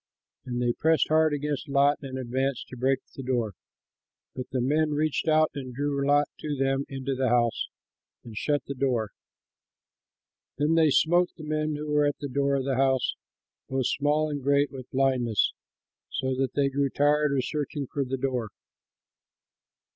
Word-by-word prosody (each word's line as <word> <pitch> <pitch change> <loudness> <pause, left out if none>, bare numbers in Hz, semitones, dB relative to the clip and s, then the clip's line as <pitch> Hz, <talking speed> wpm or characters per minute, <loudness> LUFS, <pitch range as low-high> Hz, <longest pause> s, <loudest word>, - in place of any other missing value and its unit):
And 120 -1 -3
they 120 -1 +1
pressed 160 +4 +2
hard 155 0 +4
against 145 0 -3
Lot 140 +1 +3
and 130 -2 -6
advanced 130 +1 -2
to - - -8
break 130 +2 +1
the - - -6
door. 120 -5 -1 0.8
But 130 -1 -5
the 130 - -1
men 150 +4 +1
reached 155 +1 0
out 155 0 +4
and 130 -3 -7
drew 140 0 -1
Lot 145 +1 +3
to 150 -2 -3
them 135 +1 +1
into 135 0 -3
the 130 -1 0
house 120 -1 +1 0.6
and 115 -2 -10
shut 145 +4 0
the 140 - -4
door. 125 -6 0 1.5
Then 150 +3 +2
they 160 -2 +5
smote 175 +5 +3
the 160 - -9
men 155 0 -1
who 150 +1 -5
were 150 0 +3
at 145 - -1
the 145 - -4
door 140 +1 +1
of 135 -1 -1
the 135 -2 0
house, 130 -1 +2 0.6
both 130 -1 0
small 150 +4 +1
and 145 -1 -3
great, 140 +1 +2
with 130 -2 -9
blindness, 130 -5 +1 0.6
so 130 0 -1
that 130 -1 -1
they 140 -1 +2
grew 140 0 0
tired 145 0 +2
of 130 - 0
searching 145 -1 -3
for 140 +2 -2
the 135 0 -3
door. 125 -4 -2
140 Hz, 175 wpm, -27 LUFS, 130-145 Hz, 1.5 s, they